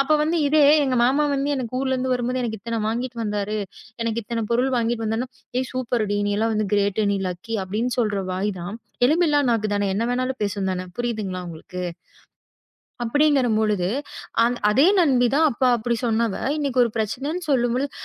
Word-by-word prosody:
அப்ப 275 +3 +2
வந்து 325 +3 +1
இதே 300 +1 +4 0.2
எங்க 255 -2 0
மாமா 280 +4 +3
வந்து 280 +1 0
என்ன 255 -3 -2
ஊர்ல 265 -1 0
இருந்து 255 0 -1
வரும்போது 250 +1 -1
எனக்கு 220 -3 -3
இத்தனை 230 +1 -3
வாங்கிட்டு 240 +2 -3
வந்தாரு. 210 0 -2 0.5
எனக்கு 230 0 -1
இத்தனை 230 0 -3
பொருள் 255 +3 +2
வாங்கிட்டு 230 -1 0
வந்தா, 225 +4 -1 0.3
"ஹேய் 260 0 0
சூப்பர்டி 235 -5 -1
நீ - - 0
எல்லாம் 225 +1 +1
வந்து 215 -1 0
கிரேட் 205 +1 +1
நீ 200 - 0
லக்கி" 220 +6 -4
அப்படின்னு 220 +6 -2
சொல்ற 210 -4 +1
வாய் 190 +3 -1
தான். 180 +5 -5 0.3
எலும் 315 +7 +4
இல்லா 295 -2 +3
நாக்கு 215 -2 +1
தான. 205 0 0
என்ன 210 +4 -1
வேணாலும் 255 +1 -1
பேசும் 200 -1 -1
தான. 185 0 -2
புரியுதுங்களா 215 -6 -3
உங்களுக்கு? 175 +2 -7 1.2
அப்படிங்கிற 285 0 +3
பொழுது 210 -5 +1 0.6
அந் 240 +1 +1
அதே 270 +10 +5
நண்பி 260 -7 +4
தான். 315 +2 +4
அப்ப 250 +1 -8
அப்படி 235 +1 -1
சொன்னவ 225 -2 +1 0.2
இன்னைக்கு 270 -4 +2
ஒரு 235 - -2
பிரச்சனைன்னு 270 - -2
சொல்லும்பொழுது, 255 +1 +1
235 Hz, 180 wpm, -23 LUFS, 215-260 Hz, 1.2 s, அதே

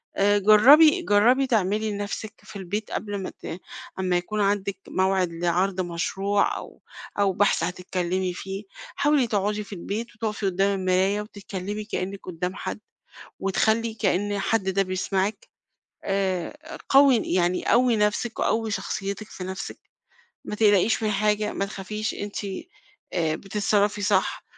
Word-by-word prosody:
آآ، 205 +1 +3
جربي 270 - +7
جربي 250 +1 +4
تعملي 215 -2 +1
لنَفسِك 205 +1 -4
في - - -13
البيت 200 +2 -4
قبل 205 -2 -3
ما - - -4
ت 170 - -8 0.4
امّا 185 -1 +1
يكون 210 +4 -2
عندِك 200 -1 0
موعِد 190 -1 +1
لعرض 180 +3 0
مشروع 190 +3 0
أو - - -11 0.4
أو 200 -1 +3
بحث 205 -1 +2
هتتكلمي 180 +1 -2
فيه، 195 +2 -6 0.3
حاولي 290 -4 +3
تقعدي 210 0 -1
في 205 - -10
البيت 210 +6 -5
وتقفي 215 -2 -3
قدّام 195 +1 +1
المراية 190 +2 +2
وتتكلمي 205 0 -6
كأنِّك 200 -2 -4
قدّام 180 +1 -4
حد - - -5 0.6
وتخلّي 220 +4 +1
كأن 205 -1 0
حد 195 -1 0
ده 195 +1 +2
بيسمعِك، 190 +2 -2 0.6
آآ، 195 - -2
قوّي 275 -1 +6
يعني 180 0 +1
قوّي 245 -1 +4
نَفسِك 210 +2 0
وقوّي 225 0 0
شخصيتِك 200 +1 -4
في 185 - -8
نَفسِك، 190 +1 -6 0.7
ما - - -4
تقلقيش 210 0 +3
من 215 - +1
حاجة، 210 +1 +1
ما 200 - -1
تخافيش، 210 +2 -4
أنتِ 205 +1 -5 0.7
آآ، 160 -3 +1
بتتصرفي 205 +2 0
صح 200 -2 +1
200 Hz, 135 wpm, -25 LUFS, 190-215 Hz, 0.7 s, جربي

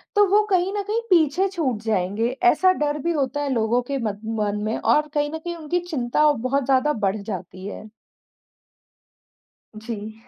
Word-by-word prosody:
तो 410 0 +6
वो 415 +2 +5
कहीं 370 0 +2
न 410 - -1
कहीं 430 +3 -1
पीछे 345 +1 +3
छूट 300 - -2
जाएँगे। 215 +1 0 0.2
ऐसा 370 0 +4
डर 295 0 0
भी 340 +4 -1
होता 290 -2 -1
है 285 - -2
लोगों 230 +1 +1
के 280 - -1
मन 205 -2 -3 0.2
मन 210 0 -1
में 215 +1 -1
और 300 0 +2
कहीं 295 -1 0
न - - -2
कहीं 345 +1 -5
उनकी 330 +2 -2
चिंता 300 +1 +2
बहुत 265 +1 -1
ज़्यादा 270 +3 +2
बढ़ 195 +2 +1
जाती 190 -2 -7
है। 210 +1 -8 1.9
जी। 215 -1 -6
275 Hz, 175 wpm, -23 LUFS, 220-330 Hz, 1.9 s, तो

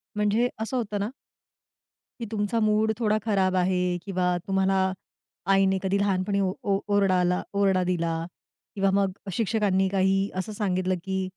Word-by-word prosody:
म्हणजे 210 +4 +2
असं 225 +4 -2
होतं 210 -3 -2
ना 205 +3 -1 1.1
की 235 - -4
तुमचा 215 +1 -1
मूड 215 0 +2
थोडा 215 -2 +2
खराब 190 -4 +1
आहे 180 0 +1 0.2
किंवा 185 -2 -1 0.2
तुम्हाला 195 0 +2 0.8
आईने 195 0 +3
कधी 195 +1 +1
लहानपणी 200 0 0
ओ 190 - +1 0.2
ओ 195 - +3 0.2
ओरडाला 180 -2 +2 0.2
ओरडा 190 -2 +3
दिला 170 -2 0 0.6
किंवा 195 -1 +2
मग 195 -1 +2 0.2
शिक्षकांनी 205 -3 +1
काही 195 +1 +1
असं 215 +2 -7
सांगितलं 185 -3 0
की 190 -1 -2
195 Hz, 145 wpm, -26 LUFS, 185-210 Hz, 1.1 s, आईने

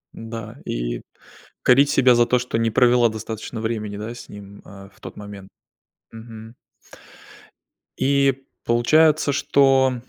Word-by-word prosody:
Н-да, 115 +1 -8
и - - -4 0.6
корить 135 +3 +5
себя 130 -3 +4
за 120 0 +4
то, 125 +1 +1
что 125 -1 -3
не 115 0 +1
провела 120 0 +4
достаточно 110 +1 -7
времени, 105 -3 -4
да, 110 +3 -6
с - - -12
ним, 100 0 -12
а, 100 -1 -13
в - - -25
тот - - -10
момент. 100 -2 -10 0.6
Мгм. 115 0 -11 1.4
И, 135 0 +1 0.2
получается, 150 +6 +3
что 135 -1 +3
115 Hz, 130 wpm, -21 LUFS, 105-130 Hz, 1.4 s, корить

